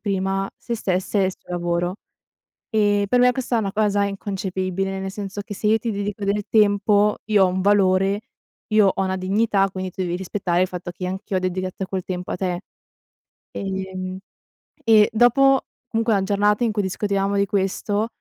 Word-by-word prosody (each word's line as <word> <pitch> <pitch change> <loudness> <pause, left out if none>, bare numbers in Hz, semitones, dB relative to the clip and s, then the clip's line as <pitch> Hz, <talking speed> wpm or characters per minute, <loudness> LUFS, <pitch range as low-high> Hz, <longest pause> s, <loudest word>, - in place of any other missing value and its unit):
prima 195 -1 -1
sé 235 - -5
stessa 190 -1 -1
e 190 - +2
suo - - -22
lavoro. 175 0 -1 0.8
Ehm, 205 -2 +2
per 245 +5 +3
me 250 0 +6
questa 250 -1 -2
è - - +3
una 195 -2 -2
cosa 205 -1 +2
inconcepibile, 195 -1 -3
nel 190 0 -4
senso 200 0 -5
che 205 0 -8
se 210 - -6
io 220 +1 +4
ti 230 - -3
dedico 205 0 -3
del 200 +1 0
tempo, 210 -1 +3
io 210 -2 +4
ho - - +3
un 185 +1 -1
valore, 195 0 +3 0.5
io 215 -2 +4
ho 195 - 0
una 190 0 0
dignità, 195 +1 +2
quindi 185 -1 -4
tu 185 +1 -4
devi 175 0 -2
rispettare 180 -1 -1
il 185 - +2
fatto 175 -1 -6
che 180 +1 -5
anch'io 190 +1 -3
ho - - +1
dedicato 185 +1 -3
quel 190 -2 -3
tempo 180 -1 -5
a - - -1
te. 180 -1 -2 0.9
Ehm, 190 -1 -4 0.6
e 220 -2 +5
dopo 260 +4 +4 0.2
comunque 225 0 +1
a 195 - +1
giornata 205 +2 +2
in 230 - +2
cui 210 -1 0
discutevamo 200 +1 -1
di 200 0 +3
questo, 205 +2 -1
195 Hz, 185 wpm, -22 LUFS, 185-210 Hz, 0.9 s, me